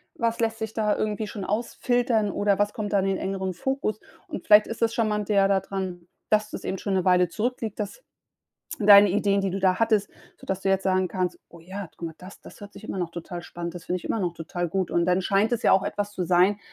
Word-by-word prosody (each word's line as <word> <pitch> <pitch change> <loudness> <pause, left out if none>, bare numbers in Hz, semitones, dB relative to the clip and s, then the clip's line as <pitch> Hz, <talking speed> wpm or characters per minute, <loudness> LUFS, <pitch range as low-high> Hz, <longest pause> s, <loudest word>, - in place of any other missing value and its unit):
was 230 0 -1
lässt 225 0 0
sich 220 -1 -4
da 210 -2 +1
irgendwie 215 0 -2
schon 205 -2 -6
ausfiltern 235 0 0
oder 205 -1 +1
was 205 0 +1
kommt 210 -2 -4
dann 195 -1 +2
in 195 -1 0
engeren 190 -1 -3
Fokus? 215 +1 -2 0.3
Und - - -7
vielleicht 210 0 +7
ist 225 - -7
das 230 0 +2
charmante 215 -3 0
ja 195 -1 +4
da 195 -1 +2
dran, 185 -3 -5 0.2
dass 215 0 +2
das - - -7
eben 190 - -2
schon 195 0 -2
'ne 185 - 0
Weile 180 -2 +4
zurückliegt, 225 0 -3
dass 210 - -5 0.8
deine 205 -2 +8
Ideen, 200 0 +1
die 195 - 0
du 195 - -3
da 185 -1 +3
hattest 220 -3 +2 0.3
sodass 190 0 -4
du 195 - +1
jetzt 195 0 +1
sagen 185 -1 +2
kannst: 180 +1 -2
„Oh 170 - -14
ja, 190 +2 -7
guck 170 - -6
mal 160 - -12
das! 185 +2 -13
Das - - -14
hört 205 0 -10
sich - - -13
immer - - -5
noch 175 -2 -2
total 175 +1 -7
spannend 170 -1 -6
das 175 -1 -8
finde 180 - -2
ich - - -16
immer 225 - -1
noch 175 -3 -1
total 175 +1 -4
gut.“ 190 0 -1
Und 170 - +2
dann 180 +1 +2
scheint 200 +5 +1
es 230 - 0
ja - - +4
auch 190 - +5
etwas 205 0 -3
zu 185 - -3
sein, 185 +3 +3
195 Hz, 245 wpm, -25 LUFS, 185-215 Hz, 0.8 s, deine